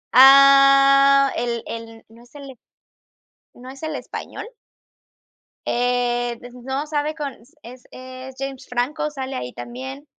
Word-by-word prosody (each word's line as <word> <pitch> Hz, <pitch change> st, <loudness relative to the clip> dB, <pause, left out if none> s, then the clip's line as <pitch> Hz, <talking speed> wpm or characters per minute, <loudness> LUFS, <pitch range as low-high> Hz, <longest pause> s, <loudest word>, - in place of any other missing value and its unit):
Ah, 275 Hz, +1 st, +6 dB
el 235 Hz, -1 st, -3 dB
el 225 Hz, 0 st, -9 dB
¿no 230 Hz, +1 st, -18 dB
es 245 Hz, -, -24 dB
el 275 Hz, -2 st, -11 dB, 1.0 s
no 250 Hz, +1 st, -13 dB
es 270 Hz, +3 st, -12 dB
el 315 Hz, -, -4 dB
español? -, -, -8 dB, 1.2 s
Eh, 245 Hz, -1 st, -1 dB
de 245 Hz, -, -10 dB
ese 245 Hz, +1 st, -15 dB
no 265 Hz, +3 st, -3 dB
sabe, 300 Hz, 0 st, -2 dB
con 295 Hz, -3 st, -5 dB
es 245 Hz, 0 st, -16 dB
es 255 Hz, 0 st, -11 dB
James 270 Hz, -1 st, -7 dB
Franco, 290 Hz, +5 st, -2 dB
sale 270 Hz, -2 st, -6 dB
ahí 125 Hz, 0 st, -6 dB
también. 265 Hz, +4 st, -9 dB
265 Hz, 135 wpm, -21 LUFS, 245-275 Hz, 1.2 s, Ah